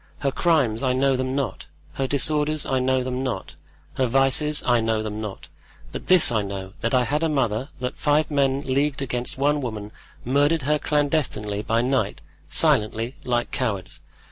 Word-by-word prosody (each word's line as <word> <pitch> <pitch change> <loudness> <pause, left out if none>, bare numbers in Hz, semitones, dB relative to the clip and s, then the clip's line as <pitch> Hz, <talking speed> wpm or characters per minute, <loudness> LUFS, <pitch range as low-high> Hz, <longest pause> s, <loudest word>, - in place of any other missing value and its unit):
Her 140 -1 +1
crimes, 135 -10 +1
I 130 -2 +1
know 135 +1 +2
them 130 +1 -2
not; 135 -4 -3 0.3
her 135 - -2
disorders, 150 +2 0
I 130 - 0
know 130 0 +1
them 130 0 -3
not; 130 -8 -4 0.4
her 130 - +2
vices, 135 +4 +3
I 120 -2 +3
know 110 -1 0
them 110 0 -5
not. 105 -3 -7 0.4
But - - -7
this 185 -7 +7
I 110 -2 +1
know, 95 -1 -6
that 115 +3 0
I 125 - +4
had 145 +6 -1
a 165 - +1
mother, 130 -3 -1
that 125 0 -4
five 150 +1 +1
men 140 -1 +1
leagued 140 +1 0
against 125 -1 -2
one 145 +2 +1
woman, 105 -4 -5 0.3
murdered 145 +4 +2
her 150 +2 +1
clandestinely 145 -9 0
by 115 +2 0
night—silently—like 120 -1 0
cowards. 100 -8 -3
130 Hz, 170 wpm, -23 LUFS, 115-145 Hz, 0.4 s, this